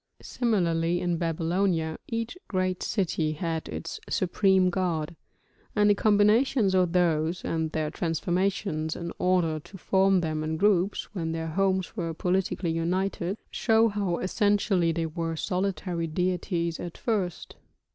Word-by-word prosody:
Similarly 175 -8 +1
in 175 -1 0
Babylonia 165 0 0
each 230 +4 -3
great 185 -2 -1
city 165 -6 0
had 160 0 -3
its 165 - -5
supreme 185 0 +3
god; 175 -3 -1 0.6
and 210 -1 +5
the - - +6
combinations 210 +2 +3
of 180 -2 +2
those, 170 -1 +1
and 160 -1 -1
their 155 -2 -2
transformations 175 -1 -1
in 170 -1 -5
order 175 -4 +2
to 195 +6 -13
form 190 +1 +3
them 155 -2 -2
in 160 +1 -2
groups 200 +1 +1
when 165 -4 -2
their 165 0 -3
homes 190 +2 0
were 165 -5 -3
politically 180 -1 0
united, 180 +3 -1
show 225 0 +3
how 200 -4 -1
essentially 200 -3 +2
they 165 0 -1
were 165 +1 -3
solitary 180 -1 -2
deities 175 0 -1
at 175 -1 -6
first. 200 -8 -2
180 Hz, 135 wpm, -27 LUFS, 165-195 Hz, 0.6 s, the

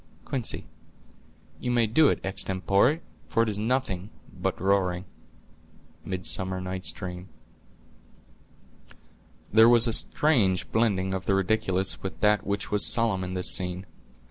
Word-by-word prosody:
Quince.—You 125 0 -8
may 120 -2 +2
do 145 +8 +3
it - - -1
extempore, 100 - 0 0.3
for 115 - +1
it 115 - -2
is 105 -1 -2
nothing 110 -5 -2 0.2
but - - -3
roaring." 95 -1 0 1.0
—Midsummer 95 +1 -2
Night's 95 0 -4
Dream. 90 -1 -8 2.2
There 110 +1 +7
was 120 -1 +6
a 115 - +1
strange 110 - +2
blending 100 -5 0
of 95 0 -5
the 100 - +2
ridiculous 95 -1 0
with 95 - -6
that 105 -1 +2
which 100 0 -3
was 105 -1 +4
solemn 110 -5 +3
in 90 0 -5
this 90 -1 +2
scene. 90 +1 -1
100 Hz, 125 wpm, -26 LUFS, 95-115 Hz, 2.2 s, There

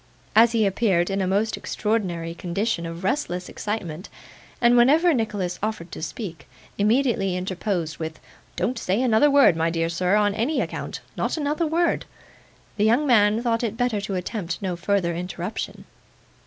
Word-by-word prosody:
As 230 +2 +6
he 225 -2 +3
appeared 195 -3 +1
in 195 0 0
a 185 - 0
most 205 +4 +1
extraordinary 180 -7 -2
condition 175 +1 -2
of 165 +2 -7
restless 185 -5 -1
excitement, 185 -5 -5 0.5
and 240 0 +5
whenever 305 +8 +5
Nicholas 205 -7 -2
offered 210 -5 -3
to - - -7
speak, 160 -1 -6 0.3
immediately 210 -3 +2
interposed 180 -3 -3
with: 160 -1 -5 0.4
'Don't 245 0 -1
say 190 +1 0
another 255 +3 +4
word, 280 - +6
my 165 +1 +1
dear 165 0 -1
sir, 180 +3 +1
on 205 -1 +3
any 235 +9 0
account - - -4
not - - -1
another 305 +2 0
word,' 335 +2 +1 0.7
the 205 - +2
young 235 +7 +3
man 220 -3 +4
thought 230 -1 0
it 225 -1 -2
better 245 -4 0
to 195 -1 -3
attempt 180 -1 -3
no 185 -3 -2
further 180 0 0
interruption. 180 +3 -5
205 Hz, 160 wpm, -24 LUFS, 180-230 Hz, 0.7 s, As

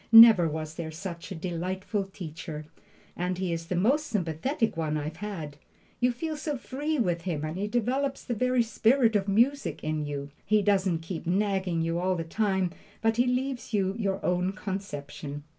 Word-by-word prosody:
Never 225 -6 +10
was 155 0 -4
there 160 -1 -5
such 170 +2 -7
a - - -3
delightful 185 +4 -2
teacher! 160 -4 -7 0.5
and 180 +1 -1
he 185 -2 -1
is 165 0 -4
the 180 - -1
most 270 - +2
sympathetic 210 - 0
one 155 -2 -1
I've 155 +2 -4
had. 165 -9 -5 0.4
You 250 0 +3
feel 310 +6 -3
so 295 -1 -3
free 295 +5 -2
with 175 -8 +1
him, 165 -4 -2
and 155 +1 -4
he 200 +3 -1
develops 255 +5 0
the 245 - -2
very 250 +2 +2
spirit 230 +1 +3
of 200 -1 +2
music 240 +8 +2
in 155 0 -1
you. 140 -1 -4
He 215 -1 +3
doesn't 190 -5 +2
keep 165 -1 -5
nagging 190 -2 +1
at - - 0
you 165 +1 0
all 185 +1 +1
the 165 - -2
time, 190 0 0 0.3
but 225 0 +3
he 245 +1 +4
leaves 250 -2 -1
you 190 -1 +2
your 200 -3 -1
own 180 +1 +1
conception. 150 -8 -5
190 Hz, 185 wpm, -28 LUFS, 165-230 Hz, 0.5 s, Never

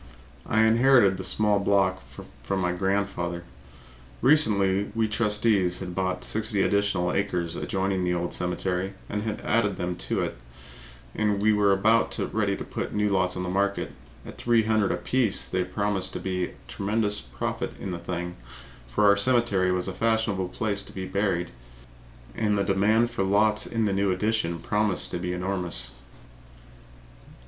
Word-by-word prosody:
I 110 0 +3
inherited 115 -3 +5
the 95 - -5
small 105 0 +2
block 95 -2 +2 0.2
I - - -7
own - - -16
from 95 -1 -2
my 90 -1 0
grandfather. 90 -2 -1 0.8
Recently 100 -9 +3
we 115 -1 +2
trustees 105 -4 +1
had 90 -2 -6
bought 95 0 -2
sixty 105 -2 -1
additional 100 -3 +1
acres 90 -4 -1
adjoining 95 -2 -1
the 90 0 0
old 85 0 -3
cemetery 90 +1 -2
and 105 - -3
had 110 -1 -4
added 105 -4 +1
them 90 0 -2
to - - 0
it, - - -4 0.7
and 105 -2 0
we 105 +1 +3
were 105 -1 +3
about 110 +4 +2 0.2
ready 100 -2 0
to - - -5
put - - -4
the - - -5
new 105 0 +2
lots 95 -2 +1
on 90 - -2
the 90 - -3
market. 100 +2 0 0.3
At - - -10
$300 110 -4 +2
apiece 105 +5 0
there 90 -1 -1
promised 95 0 -2
to - - -4
be 90 -1 -2
a - - -10
tremendous 105 +1 0
profit 60 -3 -4
in 95 - -5
the 85 - -4
thing, 90 0 -5 0.5
for 60 +12 +1
our 100 0 +6
cemetery 100 -4 +2
was 90 0 -1
a 95 - -3
fashionable 110 -5 0
place 100 0 -2
to - - -10
be 95 -1 -5
buried 95 -3 -1 0.8
in 115 - -2
and 105 -1 +2
the 100 - +2
demand 105 +4 +2
for 120 - -3
the 95 - 0
lots 105 +1 +3
in 115 -1 0
the 100 - +1
new 100 0 +1
addition 100 -3 0
promised 105 +1 -1
to 90 - -3
be 90 0 -3
enormous. 90 -9 -1
100 Hz, 175 wpm, -26 LUFS, 90-105 Hz, 0.8 s, our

